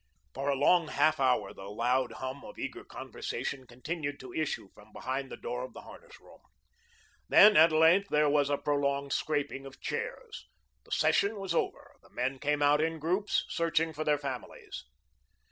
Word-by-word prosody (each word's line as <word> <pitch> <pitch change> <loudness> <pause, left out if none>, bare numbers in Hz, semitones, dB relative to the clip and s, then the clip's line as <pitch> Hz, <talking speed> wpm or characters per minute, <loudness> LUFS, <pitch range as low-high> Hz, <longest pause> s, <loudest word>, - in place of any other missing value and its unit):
For 135 +2 -2
a 140 - +2
long 170 +4 +4
half 155 0 +2
hour 130 -2 +1
the 95 0 -9
loud 120 +4 0
hum 130 +2 -6
of - - -11
eager - - -5
conversation 130 -2 -5
continued 145 +4 -5
to 130 -2 -10
issue 155 -10 -2
from 105 +1 -18
behind 130 +1 -4
the - - -8
door 125 +1 -4
of 130 - -8
the - - -9
harness - - -14
room. - - -18 0.9
Then, 210 0 +8
at 165 -2 +7
length, 165 +6 +4
there 150 0 +3
was 145 -1 +2
a 145 - +1
prolonged 140 -1 0
scraping 145 -3 -1
of 130 -1 -13
chairs. - - -5 0.4
The - - -20
session 205 +2 +2
was 195 -3 -3
over. - - -3
The - - -21
men 130 +2 -2
came 145 +1 0
out 145 +1 +4
in 165 +1 0
groups, 180 +7 0
searching 165 -1 0
for 155 +1 -3
their 150 -1 +2
families. 140 -3 -7
145 Hz, 180 wpm, -30 LUFS, 130-160 Hz, 0.9 s, Then